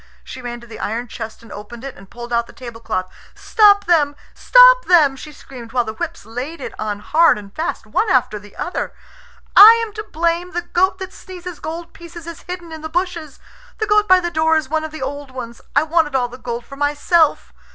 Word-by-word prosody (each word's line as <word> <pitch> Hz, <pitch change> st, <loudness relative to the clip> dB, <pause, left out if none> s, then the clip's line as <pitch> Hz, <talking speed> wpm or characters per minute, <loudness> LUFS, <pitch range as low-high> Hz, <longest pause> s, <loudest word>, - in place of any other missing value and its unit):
She 260 Hz, -, -9 dB
ran 240 Hz, -1 st, -6 dB
to -, -, -13 dB
the 230 Hz, -, -11 dB
iron 230 Hz, +3 st, -3 dB
chest 225 Hz, 0 st, -8 dB
and 225 Hz, -, -15 dB
opened 230 Hz, +3 st, -10 dB
it, 275 Hz, -1 st, -7 dB
and 195 Hz, 0 st, -16 dB
pulled 240 Hz, 0 st, -8 dB
out 235 Hz, 0 st, +1 dB
the -, -, -15 dB
tablecloth. 230 Hz, -7 st, -5 dB, 0.3 s
"Stop 410 Hz, -2 st, +4 dB
them! 300 Hz, -4 st, +2 dB, 0.2 s
Stop -, -, +6 dB
them!" 310 Hz, -7 st, +5 dB
she 300 Hz, +3 st, -10 dB
screamed, 245 Hz, -5 st, -12 dB
while 245 Hz, -1 st, +2 dB
the 220 Hz, -1 st, -6 dB
whips 335 Hz, +1 st, -6 dB
laid 250 Hz, +9 st, -6 dB
it -, -, -7 dB
on 210 Hz, -1 st, -3 dB
hard 330 Hz, +5 st, +4 dB
and 200 Hz, -1 st, -12 dB
fast, 320 Hz, -, -3 dB
one 440 Hz, -, 0 dB
after 245 Hz, -7 st, +1 dB
the 205 Hz, 0 st, -16 dB
other. 355 Hz, -, -4 dB, 0.6 s
"I 445 Hz, +3 st, +10 dB
am 430 Hz, -, -12 dB
to 430 Hz, -, -5 dB
blame. 340 Hz, 0 st, -2 dB
The 350 Hz, 0 st, -2 dB
goat 375 Hz, +2 st, +1 dB
that 375 Hz, 0 st, -8 dB
sneezes 360 Hz, -3 st, -9 dB
gold 330 Hz, +2 st, -7 dB
pieces 340 Hz, -1 st, -11 dB
is 335 Hz, -1 st, -9 dB
hidden 355 Hz, -2 st, -7 dB
in 320 Hz, -1 st, -8 dB
the 315 Hz, -, -6 dB
bushes. 340 Hz, -4 st, -3 dB, 0.4 s
The 435 Hz, -, -1 dB
goat 420 Hz, 0 st, +3 dB
by 370 Hz, -1 st, +6 dB
the 345 Hz, -1 st, -3 dB
door 320 Hz, 0 st, +2 dB
is 310 Hz, -, -2 dB
one 315 Hz, +1 st, -1 dB
of 315 Hz, -, -4 dB
the 310 Hz, -3 st, -7 dB
old 285 Hz, +1 st, -5 dB
ones. 235 Hz, -2 st, -8 dB
I -, -, +5 dB
wanted 315 Hz, -3 st, +1 dB
all 245 Hz, -2 st, +1 dB
the 250 Hz, +2 st, -12 dB
gold 235 Hz, -1 st, -5 dB
for 275 Hz, -, -11 dB
myself." 290 Hz, +3 st, +1 dB
310 Hz, 225 wpm, -19 LUFS, 240-345 Hz, 0.6 s, I